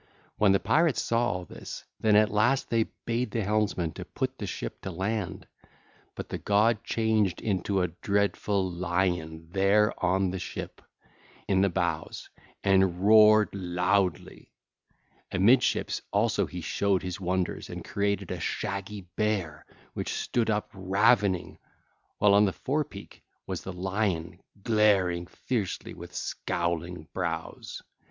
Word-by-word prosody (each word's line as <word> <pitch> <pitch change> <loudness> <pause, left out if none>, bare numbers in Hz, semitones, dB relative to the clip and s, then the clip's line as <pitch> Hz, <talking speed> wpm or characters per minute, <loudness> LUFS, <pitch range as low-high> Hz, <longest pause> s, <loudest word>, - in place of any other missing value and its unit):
When 105 -2 +5
the 95 - +4
pirates 160 -3 +2
saw 115 -1 +1
all 90 -1 -4
this, - - -9 0.2
then 110 -1 +3
at 110 +1 +5
last 120 +6 +2
they 115 -1 +2 0.2
bade 120 +1 -1
the 110 +1 -1
helmsman 100 -5 0
to - - -7
put - - -3
the - - -4
ship - - -5
to - - -5
land. 95 +2 -3 0.7
But - - -6
the - - -4
god 105 +2 +2
changed 110 -5 +1
into 100 -2 0
a - - +1
dreadful 100 +1 0
lion 85 -2 -2
there 100 +3 +3
on 95 +1 +2
the 95 - -4
ship, 85 - -7 0.7
in 95 -2 +3
the 100 - +3
bows, 85 -1 -3 0.3
and 95 -1 +3
roared 110 0 +7
loudly: 90 -2 -1 0.8
amidships 115 +7 +3
also 105 +3 +1
he 90 -1 -7
showed 100 +2 0
his 90 +1 -5
wonders 90 0 -2
and - - -7
created 100 -2 -1
a - - -3
shaggy 100 +1 -3
bear 100 -8 -1 0.3
which - - -3
stood 115 -2 0
up 105 -1 -1
ravening, 95 0 +2 0.6
while 105 -1 +5
on 100 +1 +6
the 95 - 0
forepeak 135 -8 -4 0.2
was - - -4
the 95 - -6
lion 95 -2 -2 0.2
glaring 100 -6 +3
fiercely 105 -2 -3
with - - -11
scowling 85 -1 -3
brows. 85 -3 -4
100 Hz, 135 wpm, -28 LUFS, 90-105 Hz, 0.8 s, roared